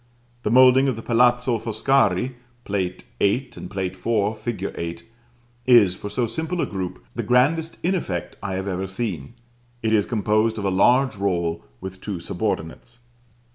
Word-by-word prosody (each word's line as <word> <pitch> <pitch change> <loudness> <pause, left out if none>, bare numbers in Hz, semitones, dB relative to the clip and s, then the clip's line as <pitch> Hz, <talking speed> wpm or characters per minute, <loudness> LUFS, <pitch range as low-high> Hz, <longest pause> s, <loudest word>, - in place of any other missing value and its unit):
The 105 - -1
moulding 130 +3 +6
of 130 - 0
the 115 - -8
Palazzo 120 0 +3
Foscari 115 0 +1 0.3
(Plate 95 -3 -2 0.2
VIII., 125 +6 +1
and - - -8
Plate 95 -1 -3
IV. 105 +2 0
fig. 105 -3 -3
8) 85 0 -5 0.6
is, 115 -7 +6
for 100 +2 -7
so 120 +3 0
simple 160 +9 -3
a - - +2
group, 90 -11 -5
the - - -2
grandest 155 +7 +2
in 180 +3 +2
effect 90 - -3
I 95 - -3
have 95 +1 -3
even 95 0 -2
seen: 95 - -4 0.5
it 110 0 +1
is 105 -2 +3
composed 110 0 +1
of 105 - -3
a 95 - +1
large 120 +5 +3
roll 85 -4 -1 0.2
with 95 0 -8
two 100 -5 -4
subordinates. 90 +5 -4
105 Hz, 165 wpm, -23 LUFS, 95-125 Hz, 0.6 s, moulding